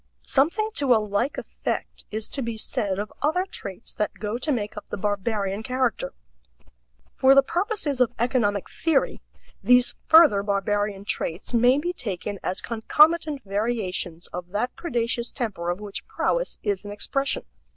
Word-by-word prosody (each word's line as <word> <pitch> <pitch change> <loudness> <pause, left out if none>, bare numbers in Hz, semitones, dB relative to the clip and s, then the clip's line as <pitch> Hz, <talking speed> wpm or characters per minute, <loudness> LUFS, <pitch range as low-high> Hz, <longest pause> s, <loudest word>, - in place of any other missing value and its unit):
Something 340 +11 +2
to 265 -4 +4
a - - +5
like 210 +5 -1
effect - - -4
is 215 0 -2
to 275 - -3
be 230 -2 -3
said 200 -3 -1
of 205 +1 -4
other 320 +6 +2
traits 200 - -8
that 210 - -2
go 215 +3 -3
to 300 +4 -1
make 215 -6 -2
up 210 - -9
the - - -4
barbarian 205 0 -1
character. 255 - -1 1.0
For 265 0 +5
the 275 - +7
purposes 340 - -1
of 245 - +4
economic 220 -5 +1
theory, 320 -5 0 0.4
these 250 0 +5
further 315 -11 +7
barbarian 200 0 -1
traits 175 +2 -3
may 245 +3 +5
be 345 +5 -1
taken 200 - -4
as 185 - -1
concomitant 300 +5 +3
variations 195 -5 -2
of 180 0 -5
that 210 +6 -2
predaceous 235 -6 -2
temper 210 -9 -3
of 175 +2 -1
which 205 -1 -6
prowess - - -1
is 200 -2 -1
an 205 - -7
expression. 275 +7 -1
230 Hz, 155 wpm, -25 LUFS, 205-275 Hz, 1.0 s, the